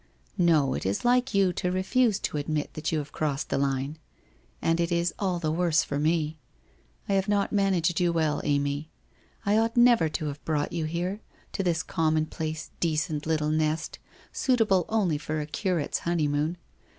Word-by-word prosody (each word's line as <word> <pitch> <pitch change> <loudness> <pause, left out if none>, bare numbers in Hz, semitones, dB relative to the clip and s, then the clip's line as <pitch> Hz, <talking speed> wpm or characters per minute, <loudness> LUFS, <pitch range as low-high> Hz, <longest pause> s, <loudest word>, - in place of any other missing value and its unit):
' - - -35
No, 140 -5 +3
it - - -3
is 95 - -1
like 250 -1 +2
you 195 -2 +3
to 180 - -1
refuse 195 +4 +2
to - - -2
admit 150 +1 -2
that 155 0 -3
you 160 - +1
have 145 -1 -4
crossed 150 -2 -2
the - - 0
line. 140 +2 -1 0.6
And 165 +1 +1
it 170 0 0
is 170 0 +1
all 185 -3 0
the 160 -3 -1
worse 165 -2 +2
for 140 - -3
me. 155 0 0 0.7
I 200 - 0
have 195 0 +1
not 205 -1 +1
managed 185 -5 +2
you 175 -1 +2
well. 155 -3 0
Amy. 145 +1 0 0.6
I 205 +2 +3
ought 225 +2 0
never 240 -9 +5
to 155 +1 -3
have 145 0 -5
brought 150 -2 -1
you 165 -2 -1
here, 175 +6 -3 0.3
to - - -2
this 175 -2 0
commonplace, 155 0 -1
decent, 155 -2 -1
little 155 -1 +1
nest, 155 0 -1 0.3
suitable 220 -9 +2
only 190 -9 +1
for 155 +1 -3
a 150 - -2
curate's 155 +2 -1
honeymoon. 155 -1 0
160 Hz, 180 wpm, -27 LUFS, 150-185 Hz, 0.7 s, never